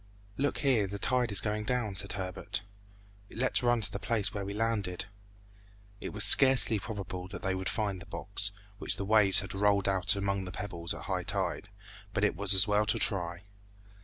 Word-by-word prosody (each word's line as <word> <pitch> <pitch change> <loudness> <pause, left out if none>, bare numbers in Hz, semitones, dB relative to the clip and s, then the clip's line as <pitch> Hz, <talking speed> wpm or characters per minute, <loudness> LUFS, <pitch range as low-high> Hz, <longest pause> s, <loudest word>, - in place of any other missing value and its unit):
"Look 140 +4 -1
here, 120 -7 +2
the 100 +1 -6
tide 125 +2 0
is 100 -1 +4
going 105 0 -3
down," 115 -2 -2
said 100 +1 0
Herbert; 95 +2 -5 0.7
"let's 130 +3 0
run 120 -1 +1
to - - +3
the - - -5
place 105 -4 -2
where 100 - -4
we 100 - -6
landed." 105 -4 -2 0.9
It - - -6
was 105 0 +2
scarcely 130 -5 +6
probable 95 -3 -7
that 95 -1 -9
they 95 - -1
would 95 0 -3
find 100 -4 -3
the 100 - -11
box, 100 +1 -3 0.3
which - - +4
the 100 - -4
waves 100 -1 +4
had 95 - -7
rolled 100 0 +1
about 95 +1 +2
among 100 -1 -2
the 90 - -7
pebbles, 90 -3 -4
at - - -10
high - - -2
tide, - - -3 0.5
but - - 0
it - - +1
was 100 +2 +3
as 95 +3 +5
well 105 +1 +1
to 110 +2 +1
try. 90 -4 +1
100 Hz, 195 wpm, -30 LUFS, 95-110 Hz, 0.9 s, scarcely